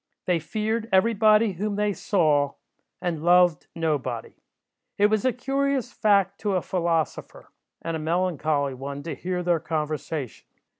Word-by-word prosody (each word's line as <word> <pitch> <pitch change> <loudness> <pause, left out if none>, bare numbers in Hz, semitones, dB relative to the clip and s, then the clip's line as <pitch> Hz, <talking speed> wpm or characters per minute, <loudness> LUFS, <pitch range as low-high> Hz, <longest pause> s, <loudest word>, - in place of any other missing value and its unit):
They 180 -2 +2
feared 220 +7 -2
every 190 +5 +4
body 215 0 +4
whom 200 +3 -3
they 210 0 0
saw, 150 -8 +1 0.5
and 170 -4 -2
loved 175 -2 +4
nobody. 145 -8 -2 0.6
It 205 +1 +4
was 215 +1 +1
a 255 - +4
curious 270 +1 -1
fact 200 -2 +2
to 205 -3 -1
a 180 - 0
philosopher, 170 -4 -2 0.3
and 165 -1 -2
a - - -3
melancholy 155 -4 0
one 140 +2 -6
to 165 - -4
hear 180 0 -3
their 175 -2 +2
conversation. 155 -4 -4
180 Hz, 145 wpm, -25 LUFS, 155-210 Hz, 0.6 s, every